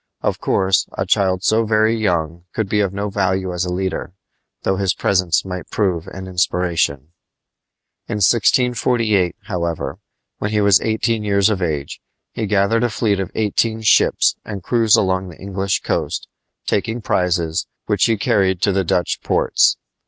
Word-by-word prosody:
Of -, -, -1 dB
course, 95 Hz, 0 st, +1 dB
a 95 Hz, -, -1 dB
child 95 Hz, -1 st, +1 dB
so 110 Hz, +3 st, +3 dB
very 110 Hz, +1 st, +2 dB
young 85 Hz, -5 st, -1 dB
could 110 Hz, -3 st, -1 dB
be 105 Hz, +2 st, 0 dB
of 100 Hz, -3 st, +1 dB
no 100 Hz, +1 st, -4 dB
value 95 Hz, -2 st, -1 dB
as 90 Hz, +1 st, -1 dB
a 90 Hz, -, -3 dB
leader, 95 Hz, 0 st, -3 dB, 0.5 s
though 95 Hz, -, 0 dB
his 95 Hz, -2 st, 0 dB
presence 90 Hz, -4 st, +1 dB
might 90 Hz, -1 st, -6 dB
prove 90 Hz, -6 st, -1 dB
an 95 Hz, -1 st, -8 dB
inspiration. 85 Hz, -5 st, -1 dB, 0.9 s
In -, -, -3 dB
1648, 115 Hz, -2 st, +2 dB
however, 85 Hz, -5 st, -3 dB, 0.4 s
when 105 Hz, -, -2 dB
he 105 Hz, 0 st, 0 dB
was 100 Hz, -2 st, +5 dB
eighteen 110 Hz, 0 st, 0 dB
years 100 Hz, 0 st, +2 dB
of 95 Hz, -3 st, -2 dB
age, 75 Hz, -5 st, -3 dB, 0.3 s
he 110 Hz, -, -3 dB
gathered 105 Hz, +3 st, +2 dB
a 120 Hz, -, +2 dB
fleet 105 Hz, -3 st, 0 dB
of 95 Hz, -1 st, -3 dB
eighteen 110 Hz, +1 st, 0 dB
ships 110 Hz, -, +4 dB
and 100 Hz, -4 st, -7 dB
cruised 115 Hz, -1 st, +3 dB
along 95 Hz, -1 st, 0 dB
the 85 Hz, -, -12 dB
English 100 Hz, 0 st, -2 dB
coast, -, -, -2 dB, 0.4 s
taking 115 Hz, +3 st, -1 dB
prizes, 85 Hz, -3 st, 0 dB, 0.2 s
which 105 Hz, -1 st, +2 dB
he 115 Hz, -2 st, +1 dB
carried 95 Hz, -2 st, +1 dB
to 100 Hz, -, +3 dB
the 95 Hz, 0 st, +1 dB
Dutch 90 Hz, +1 st, -1 dB
ports. -, -, +2 dB
95 Hz, 160 wpm, -19 LUFS, 90-110 Hz, 0.9 s, was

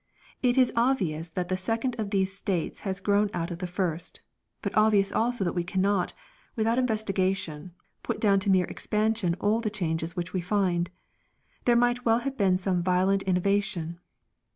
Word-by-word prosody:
It 250 Hz, 0 st, +2 dB
is 255 Hz, -2 st, +4 dB
obvious 185 Hz, -, +1 dB
that 180 Hz, +2 st, -3 dB
the 185 Hz, -, +1 dB
second 225 Hz, +6 st, -1 dB
of 210 Hz, -2 st, -2 dB
these 190 Hz, -1 st, 0 dB
states 190 Hz, -4 st, -2 dB
has 195 Hz, -1 st, -3 dB
grown 205 Hz, +1 st, +2 dB
out 170 Hz, +1 st, -2 dB
of 170 Hz, -, -5 dB
the 180 Hz, -, -3 dB
first, 175 Hz, -1 st, -3 dB, 0.4 s
but -, -, -3 dB
obvious 215 Hz, -2 st, +4 dB
also 240 Hz, -2 st, +1 dB
that 175 Hz, -, -1 dB
we 175 Hz, -, -1 dB
cannot, 190 Hz, +1 st, 0 dB, 0.4 s
without 230 Hz, +2 st, +1 dB
investigation, 195 Hz, -8 st, -1 dB, 0.3 s
put -, -, -3 dB
down 200 Hz, -2 st, +4 dB
to 195 Hz, -, -2 dB
mere 185 Hz, -2 st, +4 dB
expansion 215 Hz, -4 st, 0 dB
all 215 Hz, +3 st, +1 dB
the 220 Hz, -, -1 dB
changes 165 Hz, -4 st, -2 dB
which 175 Hz, 0 st, -4 dB
we 185 Hz, -, 0 dB
find; 180 Hz, -2 st, 0 dB, 0.8 s
there 240 Hz, -, +4 dB
might 245 Hz, +1 st, +2 dB
well 225 Hz, -1 st, +4 dB
have 275 Hz, +2 st, -3 dB
been 190 Hz, -6 st, +3 dB
some 185 Hz, -1 st, 0 dB
violent 185 Hz, +2 st, +2 dB
innovation. 180 Hz, -3 st, 0 dB
195 Hz, 175 wpm, -27 LUFS, 180-220 Hz, 0.8 s, is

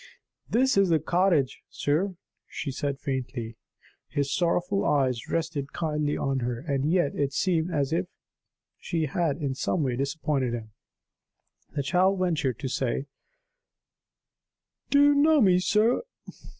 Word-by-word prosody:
"This 260 Hz, 0 st, +2 dB
is 195 Hz, -2 st, +4 dB
the 165 Hz, -, +4 dB
cottage, 170 Hz, -4 st, +1 dB
sir," 180 Hz, +7 st, -1 dB, 0.3 s
she 140 Hz, -, -5 dB
said 140 Hz, +1 st, -3 dB
faintly. 125 Hz, -4 st, -4 dB, 0.5 s
His 140 Hz, -2 st, -1 dB
sorrowful 180 Hz, +3 st, +1 dB
eyes 130 Hz, -5 st, +1 dB
rested 155 Hz, -4 st, -2 dB
kindly 150 Hz, -2 st, -1 dB
on 135 Hz, -1 st, -1 dB
her. 120 Hz, -1 st, -2 dB
And 140 Hz, +2 st, -1 dB
yet, 175 Hz, -6 st, +2 dB
it 140 Hz, -1 st, -1 dB
seemed 170 Hz, -1 st, +1 dB
as 140 Hz, -4 st, 0 dB
if 90 Hz, -, 0 dB, 0.7 s
she 165 Hz, -2 st, -1 dB
had 150 Hz, 0 st, -1 dB
in 140 Hz, -4 st, -2 dB
some 150 Hz, +4 st, -1 dB
way 130 Hz, -3 st, 0 dB
disappointed 140 Hz, -2 st, -1 dB
him. 110 Hz, -2 st, -8 dB, 1.0 s
The 140 Hz, -, 0 dB
child 190 Hz, +5 st, +2 dB
ventured 160 Hz, -, 0 dB
to 135 Hz, -, -2 dB
say: 130 Hz, +1 st, -1 dB, 1.8 s
"Do 285 Hz, 0 st, +5 dB
you 290 Hz, 0 st, +6 dB
know 300 Hz, +2 st, +4 dB
me, 185 Hz, -6 st, +5 dB
sir?" 215 Hz, +6 st, +2 dB
150 Hz, 135 wpm, -27 LUFS, 135-180 Hz, 1.8 s, you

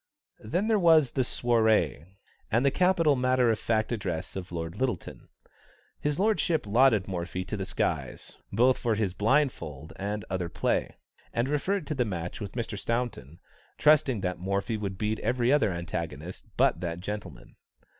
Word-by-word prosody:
Then 185 Hz, +6 st, -1 dB
there 220 Hz, -2 st, +3 dB
was 160 Hz, -7 st, +5 dB
the 130 Hz, -, 0 dB
soirée, 110 Hz, -, +1 dB, 0.4 s
and 120 Hz, +5 st, +2 dB
the 140 Hz, -, +4 dB
capital 170 Hz, -4 st, +3 dB
matter 125 Hz, -2 st, +3 dB
of 110 Hz, -, -1 dB
fact 110 Hz, 0 st, 0 dB
address 95 Hz, -8 st, -3 dB
of 90 Hz, -2 st, -6 dB
Lord 80 Hz, -1 st, -4 dB
Lyttelton. 125 Hz, -8 st, -3 dB, 0.7 s
His 150 Hz, 0 st, -1 dB
lordship 195 Hz, -, +1 dB
lauded 110 Hz, -2 st, +4 dB
Morphy 90 Hz, 0 st, -4 dB
to -, -, -4 dB
the 95 Hz, -2 st, -3 dB
skies, -, -, -3 dB
both 125 Hz, +5 st, +3 dB
for 115 Hz, -3 st, +1 dB
his 105 Hz, -4 st, -1 dB
blindfold 100 Hz, -, 0 dB
and 105 Hz, +1 st, -3 dB
other 90 Hz, -2 st, -2 dB
play, -, -, -1 dB, 0.4 s
and 115 Hz, +2 st, +1 dB
referred 155 Hz, +5 st, 0 dB
to 155 Hz, -, -2 dB
the 130 Hz, -4 st, +1 dB
match 90 Hz, -3 st, -5 dB
with 100 Hz, -2 st, -5 dB
Mr. 115 Hz, -4 st, -4 dB
Staunton, 115 Hz, -, -3 dB, 0.4 s
trusting 145 Hz, -7 st, +4 dB
that 90 Hz, -2 st, -2 dB
Morphy 100 Hz, +4 st, -1 dB
would 100 Hz, -3 st, -4 dB
beat 110 Hz, +1 st, -1 dB
every 120 Hz, +3 st, +1 dB
other 115 Hz, -9 st, +3 dB
antagonist 85 Hz, -1 st, -5 dB
but 85 Hz, -, +3 dB
that 85 Hz, -1 st, -3 dB
gentleman. 90 Hz, -10 st, -7 dB
110 Hz, 160 wpm, -28 LUFS, 90-130 Hz, 0.7 s, was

